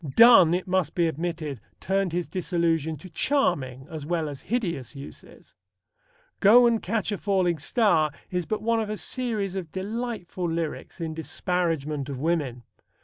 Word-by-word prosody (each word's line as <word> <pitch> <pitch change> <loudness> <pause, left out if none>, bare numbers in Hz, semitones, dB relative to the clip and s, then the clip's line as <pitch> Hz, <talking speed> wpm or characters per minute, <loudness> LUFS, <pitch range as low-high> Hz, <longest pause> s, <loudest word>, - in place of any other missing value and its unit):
Donne, 230 -8 +8
it 180 - -3
must 180 -4 0
be 175 - +3
admitted, 160 - -3 0.2
turned 195 -1 0
his 175 +1 -2
disillusion 165 -4 0
to 170 - -11
charming 150 - 0
as 155 -3 -7
well 160 0 -1
as 140 -2 -8
hideous 170 - -3
uses. 140 +1 -12 0.9
Go 235 +5 +7
and 230 -2 +3
Catch 215 +1 -1
a 205 - -2
Falling 185 -5 +1
Star 165 - +2 0.2
is 180 -3 -2
but 215 - -2
one 230 0 +2
of 215 - -4
a 215 - -3
series 215 -8 -2
of 175 -5 -5
delightful 195 -3 -4
lyrics 165 +1 -4
in 165 -1 -3
disparagement 160 -4 -2
of 135 - -4
women. 140 -5 -1
175 Hz, 155 wpm, -26 LUFS, 155-200 Hz, 0.9 s, Donne